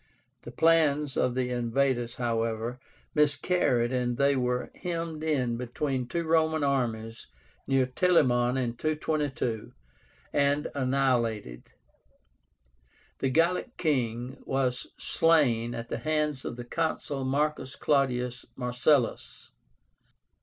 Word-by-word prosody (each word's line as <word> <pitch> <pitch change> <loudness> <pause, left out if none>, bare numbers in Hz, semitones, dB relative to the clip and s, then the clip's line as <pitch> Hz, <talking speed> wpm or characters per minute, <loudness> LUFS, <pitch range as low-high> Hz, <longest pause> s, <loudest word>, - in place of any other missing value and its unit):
The - - -9
plans 150 -4 +3
of 125 - +1
the 125 -1 -1
invaders, 120 0 0
however, 115 0 -2 0.3
miscarried, 145 -5 +2
and 125 -1 0
they 140 +1 +3
were 125 -1 -1
hemmed 165 -3 -4
in 130 -7 0
between 125 +1 -2
two 170 +7 -2
Roman 160 -1 +2
armies 115 -5 -1 0.4
near 135 -1 +3
TELAMON 125 -4 +2
in 120 -3 -1
222, 150 -7 -2 0.6
and 145 +1 +2
annihilated. 125 - -1 1.5
The 135 - +1
Gallic 175 - +1
king 125 -4 -1
was 130 -2 -1
slain 120 -8 +2
at 115 0 -6
the - - -3
hands 150 -3 -1
of - - -4
the 120 0 -7
Consul 150 -1 -2
MARCUS 140 0 -1
CLAUDIUS 125 -4 0
MARCELLUS. 125 +1 0
130 Hz, 105 wpm, -28 LUFS, 120-150 Hz, 1.5 s, plans